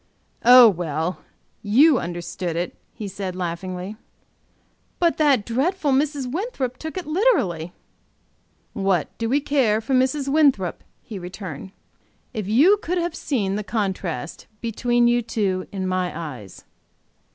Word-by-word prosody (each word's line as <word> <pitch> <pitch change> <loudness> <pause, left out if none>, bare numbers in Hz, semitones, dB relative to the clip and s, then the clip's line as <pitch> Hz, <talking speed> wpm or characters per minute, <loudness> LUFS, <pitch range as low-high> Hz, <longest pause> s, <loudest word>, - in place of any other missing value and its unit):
"Oh, 250 0 +9
well, 170 -3 -1 0.4
you 260 +7 +5
understood 175 0 -4
it," 175 +1 -2 0.2
he 210 - -7
said, 190 -1 -5
laughingly. 185 +3 -5 1.0
"But 340 -1 +2
that 280 -9 +3
dreadful 290 +6 0
Mrs. 280 0 +1
Winthrop 270 - -3
took 315 +3 -6
it 365 - -4
literally." 275 - +1 1.0
"What 195 -6 0
do 230 0 -1
we 275 +4 +3
care 270 -7 +2
for 225 +4 -3
Mrs. 265 +2 +1
Winthrop?" 275 - +2 0.2
he 215 -6 -7
returned. 180 -2 -8 0.6
"If 215 -5 -4
you 295 - +5
could 365 -3 -3
have 345 -1 -1
seen 205 - -1
the 210 - -3
contrast 190 - -3
between 240 +1 +1
you 240 0 +3
two 200 -5 -2
in 190 -2 -3
my 185 -1 -1
eyes!" 125 - -8
220 Hz, 130 wpm, -23 LUFS, 185-275 Hz, 1.0 s, Oh